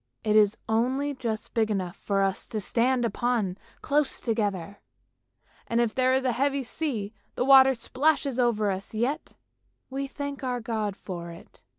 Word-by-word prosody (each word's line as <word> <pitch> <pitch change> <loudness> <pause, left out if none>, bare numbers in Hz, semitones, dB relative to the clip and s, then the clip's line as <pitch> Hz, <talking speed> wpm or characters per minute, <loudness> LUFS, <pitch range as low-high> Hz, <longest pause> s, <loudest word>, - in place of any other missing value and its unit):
It 215 0 +2
is 210 0 +5
only 260 +6 +1
just 230 -5 -4
big 220 -2 +2
enough 185 -4 -2
for 195 -1 0
us 195 -1 -1
to 220 - -3
stand 240 +4 +1
upon 230 -5 0 0.3
close 290 0 +1
together, 205 -5 -2 0.9
and 230 - +1
if 235 -2 +1
there 255 0 +3
is 265 0 0
a 255 - +3
heavy 275 +3 0
sea 235 -6 -3 0.2
the 250 - 0
water 265 -1 +7
splashes 275 +1 +1
over 215 -4 +2
us, 195 +3 -6
yet 245 +7 -1 0.6
we 275 +1 -3
thank 285 0 -6
our 250 -1 -1
God 220 -3 -2
for 175 -4 -7
it. 170 - -14
235 Hz, 165 wpm, -27 LUFS, 210-265 Hz, 0.9 s, water